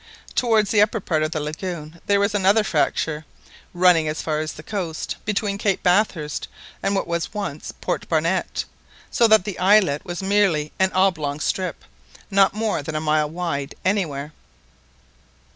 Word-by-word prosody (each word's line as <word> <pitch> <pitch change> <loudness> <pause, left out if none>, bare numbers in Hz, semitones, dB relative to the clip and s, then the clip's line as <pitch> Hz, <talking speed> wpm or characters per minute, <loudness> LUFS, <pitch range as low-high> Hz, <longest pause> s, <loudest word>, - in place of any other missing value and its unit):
Towards 220 -4 +2
the 210 - +4
upper 215 +2 +2
part 160 -5 -1
of 155 - +1
the 160 -1 -3
lagoon 155 +1 -6
there 200 0 +3
was 200 +1 +1
another 205 +2 +4
fracture, 160 -6 0 0.5
running 175 -3 +4
as 155 +1 -2
far 155 -1 -1
as 155 0 -3
the 155 - -11
coast, 175 -6 -4
between 200 -1 -1
Cape 200 -3 0
Bathurst 180 -5 +1 0.3
and 200 - 0
what 195 - 0
was 170 +4 -3
once 195 -8 -4
Port - - -3
Barnett, 165 +3 0 0.5
so 235 - +4
that 220 -4 +5
the 200 -3 -5
islet 185 -6 +4
was 175 0 -5
merely 190 -7 +2
an 190 0 +3
oblong 160 -7 +1
strip, 185 +4 -2 0.5
not 195 0 +4
more 215 -6 -1
than 155 +2 -6
a - - +1
mile 155 -1 +1
wide 160 -4 -3
anywhere. 155 -7 -1
180 Hz, 160 wpm, -22 LUFS, 155-200 Hz, 0.5 s, that